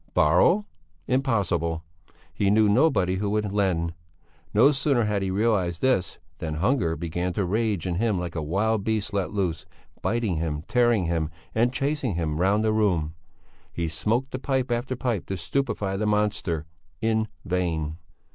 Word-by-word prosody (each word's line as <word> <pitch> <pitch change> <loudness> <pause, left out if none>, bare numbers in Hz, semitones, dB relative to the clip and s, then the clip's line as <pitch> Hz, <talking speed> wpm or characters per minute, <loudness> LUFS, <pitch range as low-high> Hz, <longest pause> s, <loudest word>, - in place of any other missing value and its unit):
Borrow? 90 - +4 0.4
Impossible! 100 - 0 0.5
He 100 - +1
knew 105 +1 +5
nobody 100 - +3
who 100 +1 -1
would 105 -1 0
lend. 90 -5 0 0.6
No 120 +8 +6
sooner 140 -3 +2
had 105 -2 0
he 95 - -1
realized 95 -4 0
this 130 -9 +1 0.2
than 80 -3 -3
hunger 85 - +1
began 85 +2 -2
to 100 - 0
rage 105 -2 0
in 90 -2 -1
him 110 -1 +1
like 90 -1 -4
a 80 - -2
wild 100 +7 0
beast 105 -1 -1
let 100 -2 0
loose, 95 -3 -2 0.3
biting 110 -7 0
him, 80 -2 -2
tearing 120 -6 +3
him 80 -2 0 0.2
and 120 +2 +2
chasing 135 - -1
him 80 -1 -1
round 100 +3 +3
the 110 -1 +2
room. 90 -8 +1 0.6
He 85 -1 -2
smoked 110 +12 -1
pipe 130 -3 0
after 120 +2 -1
pipe 120 -6 -2
to 95 - -3
stupefy 100 0 -1
the 105 +1 0
monster; 105 -6 0 0.3
in 110 0 +1 0.2
vain. 85 -4 -1
100 Hz, 155 wpm, -25 LUFS, 85-115 Hz, 0.6 s, No